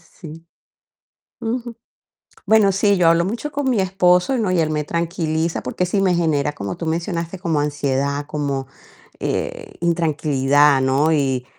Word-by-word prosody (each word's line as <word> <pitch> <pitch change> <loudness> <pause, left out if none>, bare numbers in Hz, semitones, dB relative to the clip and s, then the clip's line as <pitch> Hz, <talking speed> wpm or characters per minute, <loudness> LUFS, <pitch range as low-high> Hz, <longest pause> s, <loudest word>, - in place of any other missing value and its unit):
Sí. 165 0 -12 0.9
Ujú. 235 0 -4 0.7
Bueno, 210 -1 +4
sí, 200 +1 +2
yo 170 -2 +4
hablo 170 +1 +3
mucho 235 +9 -4
con 280 -2 -1
mi 230 -5 +1
esposo, 185 +5 +2
¿no?, 210 -5 0
y 180 - +1
él 155 -1 +1
me 150 -1 -1
tranquiliza, 165 0 -2
porque 155 +8 -2
sí 195 +2 0
me 185 -2 +2
genera, 150 -4 0
como 100 -6 -5
tú 165 - -5
mencionaste, 170 +2 -3
como 165 -5 0
ansiedad, 140 -1 -1
como, 140 -3 -3 0.5
eh, 470 -4 -4
intranquilidad, 145 -4 +2
¿no?, 135 +4 +2
y 135 -4 0
165 Hz, 150 wpm, -20 LUFS, 145-190 Hz, 0.9 s, Bueno